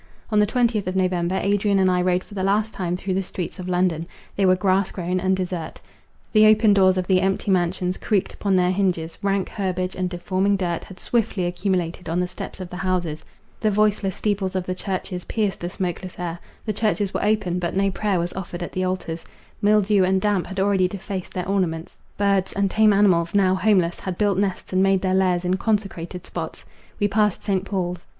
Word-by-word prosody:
On 210 Hz, -, +3 dB
the 210 Hz, -, +4 dB
twentieth 230 Hz, -4 st, +1 dB
of 185 Hz, -, -2 dB
November, 185 Hz, -1 st, +1 dB
Adrian 200 Hz, 0 st, +2 dB
and 190 Hz, -1 st, +4 dB
I 180 Hz, 0 st, +2 dB
rode 180 Hz, 0 st, +1 dB
for -, -, -15 dB
the 195 Hz, -, -3 dB
last 210 Hz, +3 st, +1 dB
time 180 Hz, -1 st, -2 dB
through 185 Hz, +1 st, -3 dB
the 190 Hz, -, +1 dB
streets 180 Hz, 0 st, -6 dB
of 185 Hz, 0 st, -5 dB
London. 180 Hz, -2 st, +1 dB, 0.3 s
They 195 Hz, -1 st, +2 dB
were 185 Hz, -, +5 dB
grass 190 Hz, +1 st, +1 dB
grown 180 Hz, 0 st, -2 dB
and 190 Hz, +1 st, +1 dB
desert. 180 Hz, -3 st, -4 dB, 0.5 s
The 215 Hz, -1 st, +7 dB
open 215 Hz, -1 st, +5 dB
doors 190 Hz, -1 st, +4 dB
of 185 Hz, -, 0 dB
the 185 Hz, 0 st, +3 dB
empty 195 Hz, +1 st, 0 dB
mansions 180 Hz, 0 st, 0 dB
creaked 200 Hz, -3 st, 0 dB
upon 200 Hz, -2 st, 0 dB
their 180 Hz, 0 st, +3 dB
hinges; 180 Hz, -4 st, -1 dB
rank 195 Hz, -1 st, 0 dB
herbage, 185 Hz, -2 st, -2 dB
and 185 Hz, -1 st, -1 dB
deforming 185 Hz, +3 st, 0 dB
dirt, 175 Hz, -3 st, -2 dB
had 185 Hz, -2 st, -12 dB
swiftly 220 Hz, -5 st, 0 dB
accumulated 175 Hz, -1 st, -2 dB
on 170 Hz, +2 st, 0 dB
the 180 Hz, -, +1 dB
steps -, -, -8 dB
of 185 Hz, -1 st, -7 dB
the 180 Hz, -, -6 dB
houses; 180 Hz, -5 st, -1 dB, 0.4 s
the 215 Hz, -, +2 dB
voiceless 205 Hz, -2 st, +1 dB
steeples 200 Hz, -3 st, -1 dB
of 185 Hz, -1 st, -1 dB
the 185 Hz, -, -2 dB
churches 185 Hz, -1 st, -4 dB
pierced 210 Hz, -3 st, -1 dB
the 175 Hz, -, -4 dB
smokeless 180 Hz, 0 st, -4 dB
air; 175 Hz, -1 st, -4 dB, 0.3 s
the 215 Hz, -, -1 dB
churches 210 Hz, -1 st, 0 dB
were -, -, -1 dB
open, 210 Hz, -4 st, +1 dB
but 175 Hz, 0 st, -2 dB
no 195 Hz, 0 st, +2 dB
prayer 200 Hz, 0 st, 0 dB
was 175 Hz, +1 st, -2 dB
offered 180 Hz, -2 st, -5 dB
at -, -, -6 dB
the 185 Hz, -, -2 dB
altars; 185 Hz, -3 st, -3 dB, 0.4 s
mildew 205 Hz, -1 st, +4 dB
and 190 Hz, +1 st, +2 dB
damp 205 Hz, -2 st, 0 dB
had 190 Hz, 0 st, -5 dB
already 190 Hz, -1 st, +3 dB
defaced 190 Hz, 0 st, -6 dB
their 180 Hz, -1 st, -2 dB
ornaments; 180 Hz, -4 st, -2 dB, 0.2 s
birds, 200 Hz, -2 st, +1 dB
and 195 Hz, -1 st, 0 dB
tame 215 Hz, -1 st, +5 dB
animals, 185 Hz, -4 st, +3 dB
now 190 Hz, -2 st, +4 dB
homeless, 185 Hz, -3 st, +2 dB
had 185 Hz, -2 st, -5 dB
built 200 Hz, -3 st, +2 dB
nests, 195 Hz, -2 st, -2 dB
and 185 Hz, -, +3 dB
made 195 Hz, -1 st, +3 dB
their 185 Hz, -1 st, +1 dB
lairs 185 Hz, -2 st, +2 dB
in 185 Hz, +1 st, +1 dB
consecrated 195 Hz, -5 st, -2 dB
spots. -, -, -6 dB, 0.3 s
We 205 Hz, -, +3 dB
passed 210 Hz, -1 st, +1 dB
St. 195 Hz, -3 st, 0 dB
Paul's. 180 Hz, -3 st, -2 dB
185 Hz, 210 wpm, -23 LUFS, 180-200 Hz, 0.5 s, The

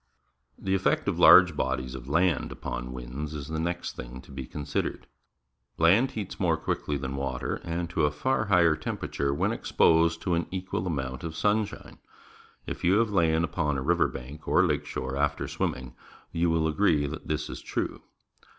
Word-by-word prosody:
The 95 Hz, -, -2 dB
effect 95 Hz, 0 st, +1 dB
of -, -, 0 dB
large 90 Hz, -4 st, +8 dB
bodies 65 Hz, -1 st, -2 dB
of 65 Hz, 0 st, -8 dB
land 85 Hz, +2 st, +2 dB
upon -, -, -5 dB
winds 65 Hz, +5 st, -6 dB
is 75 Hz, -1 st, -6 dB
the 80 Hz, 0 st, -2 dB
next 85 Hz, +1 st, -3 dB
thing -, -, -8 dB
to 65 Hz, -, -16 dB
be 65 Hz, -2 st, -6 dB
considered. 70 Hz, -1 st, -3 dB, 0.7 s
Land 95 Hz, +11 st, +5 dB
heats 105 Hz, -4 st, -5 dB
more -, -, +2 dB
quickly 75 Hz, -, -2 dB
than 65 Hz, 0 st, -4 dB
water 70 Hz, 0 st, -3 dB
and 85 Hz, +1 st, -2 dB
to -, -, +2 dB
a -, -, +3 dB
far 110 Hz, -, 0 dB
higher 85 Hz, -5 st, +4 dB
temperature, 70 Hz, -2 st, -2 dB
when 70 Hz, -, 0 dB
exposed 85 Hz, 0 st, +3 dB
to 90 Hz, -, 0 dB
an 85 Hz, 0 st, 0 dB
equal 95 Hz, 0 st, -3 dB
amount 65 Hz, -6 st, -3 dB
of 80 Hz, -1 st, -5 dB
sunshine. 105 Hz, +3 st, -1 dB, 0.7 s
If -, -, -6 dB
you 90 Hz, -, +4 dB
have 115 Hz, -1 st, +2 dB
lain 80 Hz, -4 st, +3 dB
upon 75 Hz, -3 st, -1 dB
a 65 Hz, -, -3 dB
river 85 Hz, +4 st, +3 dB
bank 70 Hz, +5 st, -9 dB
or -, -, +4 dB
lake -, -, 0 dB
shore 65 Hz, +1 st, -4 dB
after 75 Hz, 0 st, 0 dB
swimming, 65 Hz, -1 st, -3 dB, 0.4 s
you 85 Hz, +1 st, +1 dB
will 80 Hz, -1 st, +2 dB
agree 75 Hz, -2 st, +2 dB
that 75 Hz, +3 st, -6 dB
this 75 Hz, -2 st, -2 dB
is -, -, -7 dB
true. -, -, -3 dB
80 Hz, 180 wpm, -27 LUFS, 70-85 Hz, 0.7 s, large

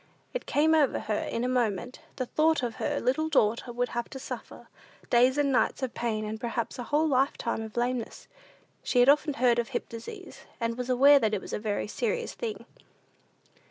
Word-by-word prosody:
It -, -, -4 dB
came 315 Hz, +2 st, +3 dB
over 300 Hz, -4 st, +3 dB
her 215 Hz, -1 st, -1 dB
in 230 Hz, -, -2 dB
a -, -, +1 dB
moment, 245 Hz, -2 st, -1 dB, 0.2 s
the 255 Hz, -, -2 dB
thought 315 Hz, +2 st, +2 dB
of 235 Hz, -2 st, -2 dB
what -, -, -1 dB
her 290 Hz, -1 st, -1 dB
little 270 Hz, +6 st, 0 dB
daughter 235 Hz, -4 st, +1 dB
would 245 Hz, +1 st, -1 dB
have 240 Hz, 0 st, -3 dB
to 270 Hz, -, -8 dB
suffer -, -, -8 dB, 0.4 s
days 250 Hz, +3 st, +4 dB
and 285 Hz, -1 st, +2 dB
nights 265 Hz, +1 st, +1 dB
of 255 Hz, -, -2 dB
pain, 220 Hz, -2 st, -2 dB
and 215 Hz, +1 st, -5 dB
perhaps 235 Hz, 0 st, -3 dB
a 245 Hz, -, -4 dB
whole 300 Hz, +4 st, +2 dB
lifetime 260 Hz, -4 st, 0 dB
of 220 Hz, +1 st, -8 dB
lameness. 240 Hz, -1 st, -2 dB, 0.5 s
She 250 Hz, -, +1 dB
had 245 Hz, +2 st, +6 dB
often 295 Hz, 0 st, +3 dB
heard 240 Hz, -1 st, +3 dB
of 235 Hz, -, -1 dB
hip -, -, -4 dB
disease, 370 Hz, -, -9 dB, 0.2 s
and 230 Hz, -1 st, -1 dB
was 250 Hz, +1 st, -5 dB
aware 280 Hz, +3 st, +7 dB
that 220 Hz, -4 st, +1 dB
it 195 Hz, -, -4 dB
is -, -, -8 dB
a -, -, -1 dB
very 210 Hz, -1 st, -2 dB
serious 470 Hz, -, -2 dB
thing. 445 Hz, -3 st, -5 dB
250 Hz, 205 wpm, -28 LUFS, 230-290 Hz, 0.5 s, aware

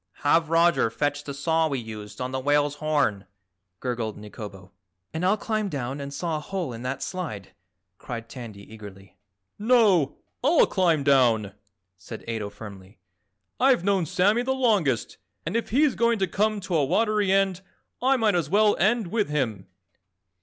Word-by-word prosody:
"Have 160 Hz, +2 st, +3 dB
Roger 165 Hz, -6 st, +3 dB
fetch 145 Hz, +6 st, -2 dB
the 140 Hz, -, -5 dB
saw 160 Hz, +3 st, +1 dB
we 140 Hz, -3 st, -2 dB
used 110 Hz, -2 st, -8 dB
on 130 Hz, 0 st, -3 dB
the 130 Hz, -, -2 dB
whale's 145 Hz, +1 st, +1 dB
horn," 145 Hz, -11 st, 0 dB, 0.5 s
gurgled 120 Hz, -4 st, -3 dB
Nikobo. 105 Hz, -2 st, -10 dB, 0.4 s
"And 160 Hz, +2 st, -3 dB
I'll 195 Hz, +4 st, +3 dB
climb 215 Hz, -1 st, -2 dB
down 135 Hz, -2 st, -4 dB
and 140 Hz, 0 st, -6 dB
saw 160 Hz, +2 st, -2 dB
a -, -, -4 dB
hole 170 Hz, -3 st, -4 dB
in 115 Hz, -, -8 dB
that 130 Hz, +2 st, -3 dB
slide," 160 Hz, -, -5 dB, 0.5 s
cried 115 Hz, -2 st, -6 dB
Tandy 115 Hz, -6 st, -9 dB
eagerly. 100 Hz, -3 st, -12 dB, 0.4 s
"No, 210 Hz, -, +3 dB, 0.3 s
I'll 300 Hz, +5 st, +5 dB
climb 170 Hz, -6 st, +1 dB
down," 120 Hz, -7 st, +3 dB, 0.5 s
said 110 Hz, +5 st, -9 dB
Ato 110 Hz, -3 st, -3 dB
firmly. 100 Hz, -2 st, -12 dB, 0.6 s
"I've 260 Hz, -7 st, +4 dB
known 190 Hz, -4 st, +1 dB
Sammy 205 Hz, +9 st, +2 dB
the 265 Hz, +2 st, -1 dB
longest 205 Hz, -, +1 dB, 0.3 s
and 170 Hz, +7 st, -3 dB
if 230 Hz, -, -1 dB
he's 280 Hz, +3 st, +3 dB
going 235 Hz, 0 st, +2 dB
to 195 Hz, -, +1 dB
come 210 Hz, +4 st, 0 dB
to 185 Hz, -1 st, -5 dB
a 150 Hz, -, +3 dB
watery 210 Hz, +5 st, +1 dB
end 195 Hz, -1 st, +2 dB, 0.4 s
I 265 Hz, +2 st, +3 dB
might 220 Hz, -4 st, +2 dB
as 170 Hz, -5 st, 0 dB
well 210 Hz, +3 st, +4 dB
end 215 Hz, +4 st, +2 dB
with 210 Hz, +1 st, -1 dB
him." 115 Hz, -11 st, -2 dB
155 Hz, 165 wpm, -25 LUFS, -, 0.6 s, I'll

